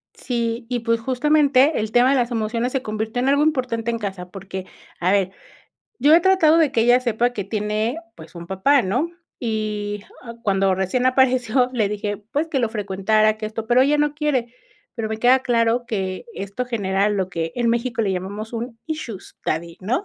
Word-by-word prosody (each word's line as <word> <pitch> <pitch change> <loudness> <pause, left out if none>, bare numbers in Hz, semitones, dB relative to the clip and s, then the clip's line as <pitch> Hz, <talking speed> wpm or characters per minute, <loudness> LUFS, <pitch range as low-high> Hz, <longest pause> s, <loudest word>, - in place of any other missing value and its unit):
Sí, 235 -1 -3
y 245 -1 -1
pues 230 0 0
justamente 280 +3 +3
el 215 0 -3
tema 245 +2 +5
de 275 - +3
las 245 -1 +1
emociones 230 +2 -1
se 270 - -1
convirtió 220 +2 -3
en 260 - +1
algo 285 +1 +3
importante 250 -6 0
en 230 - -2
casa 195 -4 -5
porque, 190 0 -7 0.3
a 180 +2 +2
ver, 195 -2 +2 0.7
yo 295 +3 +5
he 330 - +8
tratado 345 -3 +4
de 310 -4 +3
que 230 - +2
ella 245 +2 +5
sepa 240 0 0
que 205 - -3
tiene, 215 - -2 0.2
pues - - -14
un 170 - -8
papá, 250 +9 +3
¿no? 245 - -1 0.3
Y, 210 -3 -3 0.4
cuando 195 -1 +2
recién 190 +7 0
apareció, 255 -1 +3
le 215 -4 +1
dije, 205 0 -3
pues 300 +4 0
que 285 -5 -1
lo 235 - +1
frecuentara, 215 +1 +1
que 215 - -5
esto, 220 +1 -5
pero 245 +2 +5
ella 290 +3 +3
no 295 0 +1
quiere. 280 -6 -1 0.4
Pero 225 -2 -4
me 220 - -3
queda 245 +3 +5
claro 235 -1 +1
que 190 - -3
esto 200 - -4
genera 200 -4 0
lo 195 -3 -1
que 165 -2 -3
en 240 -1 +1
México 235 0 0
le 200 -3 0
llamamos 200 +5 -5
un 230 0 -5
issues 305 - -6
daddy, 165 +1 -2
¿no? 245 - -1
230 Hz, 195 wpm, -22 LUFS, 205-255 Hz, 0.7 s, he